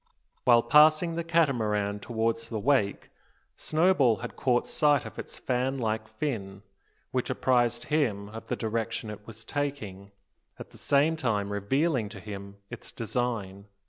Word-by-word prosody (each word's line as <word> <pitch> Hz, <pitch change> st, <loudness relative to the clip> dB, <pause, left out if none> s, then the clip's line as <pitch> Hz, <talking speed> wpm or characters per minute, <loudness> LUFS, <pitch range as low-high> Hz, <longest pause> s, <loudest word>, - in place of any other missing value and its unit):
While 120 Hz, -2 st, +6 dB
passing 155 Hz, +6 st, +5 dB
the 170 Hz, 0 st, -2 dB
Catamaran 110 Hz, -11 st, +1 dB
towards 115 Hz, +1 st, -2 dB
the 115 Hz, -, -3 dB
wake, 110 Hz, -3 st, +1 dB, 0.4 s
Snowball 155 Hz, -7 st, +3 dB
had 120 Hz, +2 st, -7 dB
caught 125 Hz, -2 st, +1 dB
sight 145 Hz, -3 st, +2 dB
of -, -, -9 dB
its -, -, -7 dB
fan 130 Hz, +1 st, -1 dB
like 110 Hz, -3 st, -2 dB
fin, 100 Hz, -11 st, -4 dB, 0.5 s
which -, -, -1 dB
apprised 120 Hz, -2 st, +1 dB
him 120 Hz, -10 st, 0 dB
of 110 Hz, +1 st, -9 dB
the -, -, -1 dB
direction 110 Hz, -1 st, -3 dB
it 105 Hz, 0 st, -11 dB
was 115 Hz, 0 st, -10 dB
taking, 110 Hz, -10 st, -4 dB, 0.5 s
at -, -, -10 dB
the -, -, -12 dB
same 145 Hz, +3 st, +3 dB
time 105 Hz, -9 st, -1 dB
revealing 125 Hz, +3 st, 0 dB
to 100 Hz, -, -9 dB
him 100 Hz, 0 st, -8 dB, 0.2 s
its 120 Hz, -, -8 dB
design. 110 Hz, -4 st, -3 dB
115 Hz, 145 wpm, -28 LUFS, 105-140 Hz, 0.5 s, While